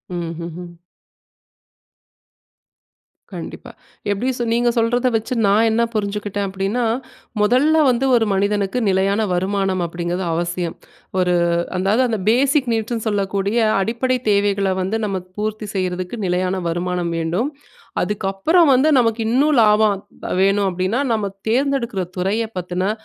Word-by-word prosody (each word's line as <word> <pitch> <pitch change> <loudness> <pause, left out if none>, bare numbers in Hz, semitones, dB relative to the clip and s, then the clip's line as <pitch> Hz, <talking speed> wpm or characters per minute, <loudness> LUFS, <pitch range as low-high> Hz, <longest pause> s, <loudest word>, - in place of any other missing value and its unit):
ம்ஹ்ஹ்ம். 170 +1 -6 2.6
கண்டிப்பா. - - -8 0.4
எப்படி 205 +6 -1
சொன்னீங்க? 235 -2 -1
நீங்க 240 0 +2
சொல்றத 240 +2 +2
வச்சு 225 +3 -1
நான் 205 +3 +4
என்ன 220 +1 +1
புரிஞ்சுக்கிட்டேன் 205 -1 -2
அப்படீன்னா, 195 +6 -1 0.6
"மொதல்ல 270 +9 +4
வந்து 250 +1 +1
ஒரு 230 -2 +3
மனிதனுக்கு 200 +3 0
நிலையான 195 +2 +2
வருமானம் 190 0 0
அப்படீங்கிறது 175 +2 -3
அவசியம். 170 0 -2 0.4
ஒரு 180 -1 +2 0.4
அதாவது, 195 +6 +2
அந்த 225 -3 -2
பேசிக் 265 +2 +2
நீட்ஸ்ன்னு 225 +1 -2
சொல்லக்கூடிய 200 +1 -1 0.2
அடிப்படை 240 +5 0
தேவைகள 200 -1 +2
வந்து, 190 +4 -1
நமக்கு 190 -3 -4
பூர்த்தி 215 0 -3
செய்றதுக்கு 185 +2 -2
நிலையான 185 +1 0
வருமானம் 175 0 -2
வேண்டும். 175 - -1 0.5
அதுக்கப்பறம் 210 - +2
வந்து 265 +5 +4
நமக்கு 230 -1 +1
இன்னும் 285 +5 +3
லாபம் 210 -2 +3 0.2
ப - - -3
வேணும் 195 +1 +3
அப்படீன்னா, 185 +7 -1
நம்ம 210 -3 -1 0.2
தேர்ந்தெடுக்குற 250 -5 0 0.2
துறைய 195 +5 0
பத்துன 180 +2 -2
200 Hz, 120 wpm, -20 LUFS, 185-230 Hz, 2.6 s, நான்